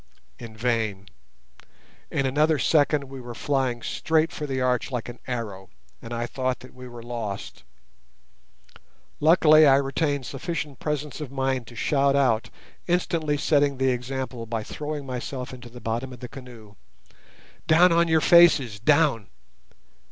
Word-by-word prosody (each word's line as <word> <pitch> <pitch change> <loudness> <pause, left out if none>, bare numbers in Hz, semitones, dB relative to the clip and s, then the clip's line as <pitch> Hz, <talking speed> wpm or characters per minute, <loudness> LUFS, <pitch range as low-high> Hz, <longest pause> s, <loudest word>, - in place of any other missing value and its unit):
In 115 -2 -10
vain; 110 -4 -1 1.0
in 140 - -1
another 150 +4 +2
second 145 0 +2
we 135 -1 -9
were 120 -1 -8
flying 130 -4 -1
straight 160 +1 0
for 150 - -5
the 135 -1 -2
arch 125 -2 0
like 125 -4 -4
an 120 - -10
arrow, 110 -6 -5 0.3
and 115 - -10
I 120 0 -2
thought 130 0 -3
that 130 - -13
we 125 0 -11
were 120 -1 -10
lost. 115 -5 -6 1.6
Luckily 155 -1 +6
I 135 - +7
retained 140 0 0
sufficient 145 0 -5
presence 150 0 -3
of 140 -4 -6
mind 130 -3 -1
to 120 - -12
shout 140 +3 +2
out, 125 -5 +2 0.4
instantly 165 -4 0
setting 145 -2 +2
the 130 0 +2
example 125 -1 -4
by 110 -1 -3
throwing 150 +3 -5
myself 125 0 -5
into 125 -1 -10
the 120 +1 -12
bottom 120 +4 -3
of 125 - -11
the 125 - -7
canoe, 120 -6 -13 0.9
"Down 170 +3 +6
on 170 0 +3
your 160 -1 +3
faces—down!" 145 - +4
130 Hz, 145 wpm, -25 LUFS, 120-150 Hz, 1.6 s, I